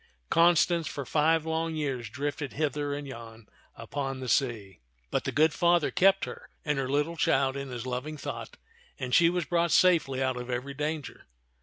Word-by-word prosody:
Constance 170 Hz, 0 st, +4 dB
for 140 Hz, -, -5 dB
five 160 Hz, +3 st, +2 dB
long 160 Hz, 0 st, -1 dB
years 135 Hz, -7 st, -3 dB
drifted 145 Hz, +3 st, -4 dB
hither 145 Hz, -1 st, -1 dB
and 145 Hz, 0 st, -4 dB
yon 115 Hz, -3 st, -10 dB, 0.3 s
upon 135 Hz, +3 st, -4 dB
the 130 Hz, -, -5 dB
sea; 110 Hz, -, 0 dB, 0.3 s
but -, -, -1 dB
the -, -, -1 dB
good 155 Hz, +1 st, +3 dB
Father 175 Hz, -2 st, +3 dB
kept 195 Hz, +1 st, +4 dB
her -, -, -10 dB, 0.2 s
and 150 Hz, -2 st, 0 dB
her 130 Hz, -1 st, -2 dB
little 145 Hz, +4 st, 0 dB
child 135 Hz, -3 st, +2 dB
in 140 Hz, -1 st, -5 dB
his 120 Hz, -1 st, -6 dB
loving 130 Hz, +5 st, -4 dB
thought, -, -, -7 dB, 0.4 s
and 125 Hz, -1 st, -4 dB
she 170 Hz, +4 st, +6 dB
was 175 Hz, -1 st, -1 dB
brought 170 Hz, +2 st, +1 dB
safely 165 Hz, -8 st, +4 dB
out 130 Hz, -1 st, 0 dB
of 125 Hz, 0 st, -6 dB
every 125 Hz, +3 st, -3 dB
danger. 150 Hz, -1 st, -4 dB
145 Hz, 180 wpm, -28 LUFS, 130-160 Hz, 0.4 s, she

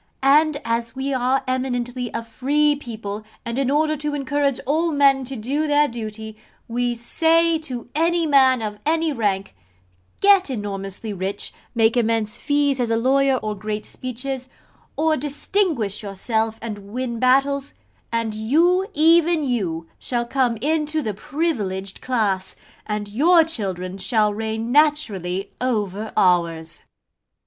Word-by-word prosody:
And 295 Hz, +2 st, +4 dB
as 230 Hz, +1 st, -2 dB
we 270 Hz, +1 st, -2 dB
are 260 Hz, +1 st, +1 dB
eminently 250 Hz, -1 st, -2 dB
a -, -, -4 dB
free 290 Hz, +6 st, +1 dB
people, 215 Hz, -6 st, -6 dB, 0.2 s
and 235 Hz, +2 st, -2 dB
in 270 Hz, -2 st, +1 dB
order 305 Hz, +2 st, +2 dB
to 295 Hz, 0 st, -3 dB
encourage 280 Hz, -1 st, 0 dB
all 315 Hz, +5 st, +1 dB
men 275 Hz, -2 st, +4 dB
to 270 Hz, +2 st, -5 dB
do 275 Hz, +7 st, -1 dB
their 295 Hz, 0 st, +4 dB
duty, 220 Hz, -2 st, -7 dB, 0.3 s
we 240 Hz, +1 st, -1 dB
say 325 Hz, +7 st, +3 dB
to 255 Hz, -7 st, -7 dB
any 335 Hz, +2 st, +2 dB
man 265 Hz, -5 st, +4 dB
of 210 Hz, -1 st, -4 dB
any 320 Hz, 0 st, +1 dB
rank 200 Hz, -, -1 dB, 0.7 s
get 395 Hz, -4 st, +5 dB
enormously 205 Hz, -2 st, -4 dB
rich, 195 Hz, +1 st, -3 dB, 0.2 s
make 225 Hz, 0 st, +3 dB
immense 225 Hz, -1 st, 0 dB
fees 285 Hz, -2 st, +1 dB
as 240 Hz, -2 st, 0 dB
a 225 Hz, -, +2 dB
lawyer, 270 Hz, +3 st, +3 dB
or 215 Hz, 0 st, -2 dB
great 210 Hz, +1 st, -4 dB
speeches, 255 Hz, +1 st, -5 dB, 0.5 s
or 315 Hz, 0 st, +2 dB
distinguish 290 Hz, -, -1 dB
yourself 220 Hz, +2 st, -2 dB
and 215 Hz, -3 st, -5 dB
win 240 Hz, -1 st, -3 dB
battles 275 Hz, +2 st, +2 dB, 0.4 s
and 230 Hz, -1 st, -1 dB
you, 330 Hz, -, +2 dB
even 325 Hz, +1 st, +4 dB
you, 180 Hz, -, -2 dB
shall 240 Hz, -1 st, -2 dB
come 245 Hz, -2 st, +1 dB
into 310 Hz, +1 st, 0 dB
the 215 Hz, -, -2 dB
privileged 200 Hz, -, -3 dB
class, 205 Hz, -7 st, -1 dB, 0.3 s
and 210 Hz, -1 st, -3 dB
your 325 Hz, -, +5 dB
children 190 Hz, -, -4 dB
shall 210 Hz, +2 st, +1 dB
reign 220 Hz, +2 st, -3 dB
naturally 210 Hz, -, +1 dB
over 215 Hz, -4 st, -1 dB
ours.' 165 Hz, -2 st, +1 dB
245 Hz, 140 wpm, -22 LUFS, 215-290 Hz, 0.7 s, get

